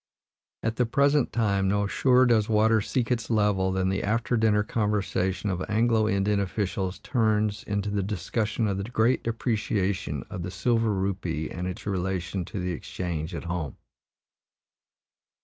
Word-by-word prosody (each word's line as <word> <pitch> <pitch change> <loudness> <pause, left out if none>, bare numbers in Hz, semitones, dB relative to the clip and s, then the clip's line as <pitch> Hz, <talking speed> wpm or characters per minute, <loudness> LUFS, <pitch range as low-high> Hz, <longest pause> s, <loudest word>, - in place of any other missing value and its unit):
At 110 0 -1
the 125 - +2
present 140 +3 +3
time, 100 -4 +1
no 100 +1 +1
surer 125 +4 +4
does 115 -3 +3
water 110 0 +4
seek 125 +3 -1
its 120 -2 -1
level 105 -4 +2
than 95 0 0
the 95 0 0
after 115 +3 0
dinner 110 -2 +3
conversation 100 -3 -1
of 90 -1 -2
Anglo 110 0 +2
Indian 100 +1 +1
officials 95 -1 -2
turns 110 -4 0
into 100 0 -2
the 100 -1 0
discussion 105 +4 -1
of 100 -1 -1
the - - -2
great 120 +1 +2
depreciation 105 - -1
of 90 - -6
the 90 - -4
silver 115 +3 +1
rupee 95 -5 -2
and 90 0 -4
its 95 +4 -6
relation 95 -1 -2
to 100 - -6
the 90 0 -2
exchange 85 0 -4
at - - -5
home. 85 -6 -4
105 Hz, 155 wpm, -27 LUFS, 95-110 Hz, -, surer